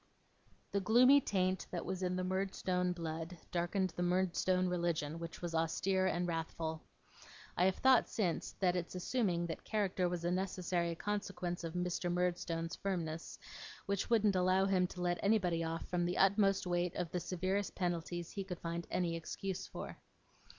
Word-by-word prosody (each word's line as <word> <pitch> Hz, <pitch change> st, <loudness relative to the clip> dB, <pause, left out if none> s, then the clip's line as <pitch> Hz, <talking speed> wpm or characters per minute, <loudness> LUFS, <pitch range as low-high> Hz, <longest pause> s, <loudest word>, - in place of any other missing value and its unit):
The 200 Hz, -, +1 dB
gloomy 250 Hz, +8 st, +6 dB
taint 185 Hz, -4 st, 0 dB
that 175 Hz, -, -4 dB
was 185 Hz, +1 st, -3 dB
in 180 Hz, 0 st, 0 dB
the 185 Hz, -, -1 dB
Murdstone 185 Hz, -1 st, 0 dB
blood, 165 Hz, 0 st, -4 dB
darkened 180 Hz, +2 st, 0 dB
the 175 Hz, -, -5 dB
Murdstone 185 Hz, +1 st, +2 dB
religion, 170 Hz, -3 st, -1 dB
which 165 Hz, +1 st, -7 dB
was 170 Hz, -1 st, -3 dB
austere 185 Hz, +4 st, +1 dB
and 175 Hz, -1 st, 0 dB
wrathful. 160 Hz, -1 st, -3 dB, 0.7 s
I 180 Hz, -, +3 dB
have 190 Hz, 0 st, +3 dB
thought, 260 Hz, -2 st, +5 dB
since, 180 Hz, -7 st, -1 dB
that 180 Hz, -2 st, +1 dB
its 175 Hz, 0 st, -3 dB
assuming 180 Hz, -3 st, 0 dB
that 165 Hz, -, -5 dB
character 195 Hz, -4 st, 0 dB
was 175 Hz, -1 st, -3 dB
a 175 Hz, -, +2 dB
necessary 180 Hz, -2 st, -1 dB
consequence 195 Hz, -3 st, -3 dB
of 165 Hz, 0 st, -5 dB
Mr. 180 Hz, 0 st, -1 dB
Murdstone's 175 Hz, -1 st, -1 dB
firmness, 165 Hz, -4 st, -3 dB, 0.5 s
which 200 Hz, -1 st, -1 dB
wouldn't 215 Hz, -4 st, +4 dB
allow 185 Hz, +1 st, +3 dB
him 185 Hz, -2 st, +3 dB
to 180 Hz, -, -8 dB
let 175 Hz, 0 st, +1 dB
anybody 185 Hz, -5 st, +2 dB
off 165 Hz, 0 st, -3 dB
from 175 Hz, -1 st, 0 dB
the 175 Hz, +1 st, -1 dB
utmost 195 Hz, 0 st, +4 dB
weight 175 Hz, 0 st, 0 dB
of 175 Hz, -2 st, -2 dB
the 180 Hz, -, -1 dB
severest 185 Hz, +3 st, -1 dB
penalties 175 Hz, -1 st, -2 dB
he 200 Hz, -, -3 dB
could 185 Hz, -2 st, -5 dB
find 170 Hz, 0 st, -4 dB
any 175 Hz, -2 st, 0 dB
excuse 185 Hz, +3 st, -4 dB
for. -, -, -7 dB
180 Hz, 165 wpm, -35 LUFS, 170-190 Hz, 0.7 s, gloomy